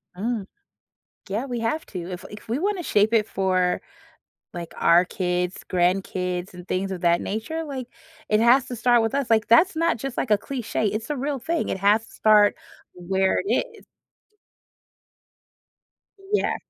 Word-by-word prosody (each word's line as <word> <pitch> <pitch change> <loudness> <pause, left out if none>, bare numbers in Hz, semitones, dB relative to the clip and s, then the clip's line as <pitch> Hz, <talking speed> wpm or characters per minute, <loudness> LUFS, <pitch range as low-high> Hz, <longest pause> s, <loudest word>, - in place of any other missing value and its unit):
Hmm. 220 +3 -2 0.8
Yeah, 215 +6 -2
we 245 -3 -4
have 230 +8 -2
to. 180 0 -6
If 180 - -7
if 210 +2 -11
we 235 +5 -1
wanna 390 0 -1
shape 210 -5 +2
it 220 -2 +3
for, 185 -3 0 0.7
like, 170 -1 -7
our 170 +2 +5
kids, 180 0 -2
grandkids, 180 0 -1
and 180 0 -11
things 190 +1 -2
of 185 -2 -5
that 170 -1 +3
nature, 225 +11 -3
like, 270 -5 -6 0.4
it 215 - +3
has 245 +3 +5
to 255 - -6
start 240 +1 +3
with 225 +3 -1
us. 280 -3 -1
Like, 220 -2 +3
that's 320 +11 +5
not 330 -5 +1
just, 270 +2 -6
like, 235 - -1
a 210 - +6
cliche, 230 -1 -3
it's 215 +5 -3
a 295 - -2
real 275 +1 -2
thing. 330 +6 -2
It - - -1
has 210 +3 +3
to - - -18
start 210 -1 +5 0.4
where 190 +2 0
it 405 - +1
is. - - -18 2.5
Yeah. 420 - +2
215 Hz, 170 wpm, -24 LUFS, 185-250 Hz, 2.5 s, a